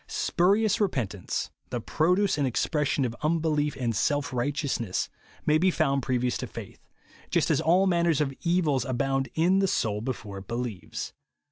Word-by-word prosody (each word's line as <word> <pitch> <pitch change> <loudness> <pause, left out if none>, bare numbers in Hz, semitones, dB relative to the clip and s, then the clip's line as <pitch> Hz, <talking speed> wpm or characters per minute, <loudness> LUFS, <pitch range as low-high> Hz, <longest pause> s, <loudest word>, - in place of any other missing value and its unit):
Spurious 200 +5 +2
repentance, 115 - -1 0.2
the - - -2
j)roduce 180 +5 +2
and 140 - +2
expression 145 +2 0
of 120 -1 -3
unbelief 155 -2 +1
and 120 -3 0
self 145 +5 0
righteousness, 125 -5 -1 0.4
may 155 +1 +4
be 185 +3 +4
found 140 -5 +1
previous 125 -1 0
to - - -4
faith; - - -9 0.3
— - - -25
just - - +2
as - - +2
all 180 +5 +4
manner 170 -2 +2
of 140 -3 0
evils 165 -7 +2
abound 135 0 -1
in 180 +4 +3
the 195 - +3
soul 105 - 0
be 130 +3 -1
fore 100 -4 -8
it 95 - -13
believes. 115 -7 -4
145 Hz, 165 wpm, -27 LUFS, 125-170 Hz, 0.4 s, may